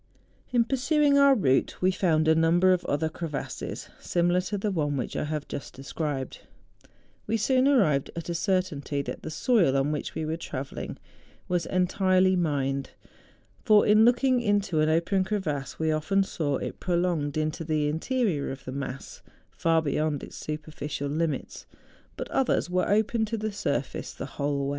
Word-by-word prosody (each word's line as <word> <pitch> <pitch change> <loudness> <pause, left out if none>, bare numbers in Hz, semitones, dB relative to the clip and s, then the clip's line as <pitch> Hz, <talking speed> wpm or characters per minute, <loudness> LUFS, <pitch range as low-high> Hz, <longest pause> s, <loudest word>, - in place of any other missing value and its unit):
In 240 -2 +4
pursuing 280 +3 +2
our 280 -1 +6
route 135 - +1
we 185 +1 +3
found 160 -4 +1
a 160 - +6
number 170 +3 +4
of 180 - -1
other 145 +3 0
crevasses 160 -2 -5
similar 175 +1 +1
to 205 +3 -3
the 205 +1 -1
one 145 -5 -1
which 125 - -4
I - - -1
have 150 -1 -4
just 140 - -7
described; 135 0 -4 0.9
we 225 +2 +1
soon 260 +4 +3
arrived 190 - +3
at 170 -1 -5
a 170 - -2
certainty 170 -6 -1
that - - -6
the - - -6
soil 165 - +2
on 135 +2 +1
which 150 - -4
we 160 - -2
were 160 +1 -2
travelling 135 -4 -6 0.5
was 175 -1 -1
entirely 185 0 +2
mined; 140 -5 -1 0.7
for, 215 -3 +5
in 215 +1 +6
looking 245 +1 +3
into 205 -6 +1
an 155 0 +3
open 170 +4 +2
crevasse, 155 -9 -3
we 160 0 0
often 175 +6 +1
saw 145 -7 -2
it - - -6
prolonged 170 -5 0
into 155 +2 -1
the 155 -2 0
interior 165 - -1
of 135 0 -9
the 130 - -5
mass, 135 0 -6 0.3
far 165 -1 +1
beyond 150 0 -1
its - - -9
superficial 150 -2 -5
limits; 155 -1 -3 0.5
but - - -4
others 250 -8 +1
were 180 0 +1
open 215 +2 +2
to 225 +1 -3
the 215 0 -3
surface 140 -8 -3
the - - -6
whole 140 -1 -2
wa)'. - - -1
165 Hz, 170 wpm, -27 LUFS, 145-200 Hz, 0.9 s, our